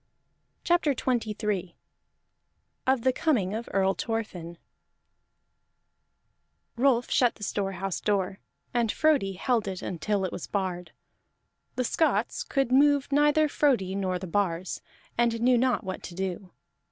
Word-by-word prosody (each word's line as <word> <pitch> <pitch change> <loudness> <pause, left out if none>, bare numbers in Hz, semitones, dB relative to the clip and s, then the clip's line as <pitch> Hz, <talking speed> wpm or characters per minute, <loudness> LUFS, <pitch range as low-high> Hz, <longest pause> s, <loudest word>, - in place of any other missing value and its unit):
CHAPTER 345 -5 +2
XXIII 210 -7 -1 1.1
OF 260 -2 +3
THE 260 0 +3
COMING 225 - +1
OF 225 +2 -4
EARL 195 0 +2
THORFINN 180 -6 -4 2.2
Rolf 245 -1 +2
shut 245 -2 +3
the 210 - -10
storehouse 195 -2 -2
door, 195 -2 0 0.3
and 235 -3 +2
Frodi 290 -11 +2
held 225 +4 0
it 190 -2 -4
until 190 +2 -1
it 185 - -3
was - - -6
barred. 180 -4 -3 0.8
The 255 - 0
Scots 240 -4 +1
could 270 -3 0
move 285 +1 +4
neither 295 +2 +4
Frodi 250 -11 +1
nor 190 -2 -1
the 185 - -6
bars, 185 -1 -1 0.4
and 235 -1 +2
knew 250 +2 +4
not 250 -1 +1
what 190 -1 -5
to 175 - -9
do. 185 0 -4
210 Hz, 130 wpm, -27 LUFS, 190-255 Hz, 2.2 s, move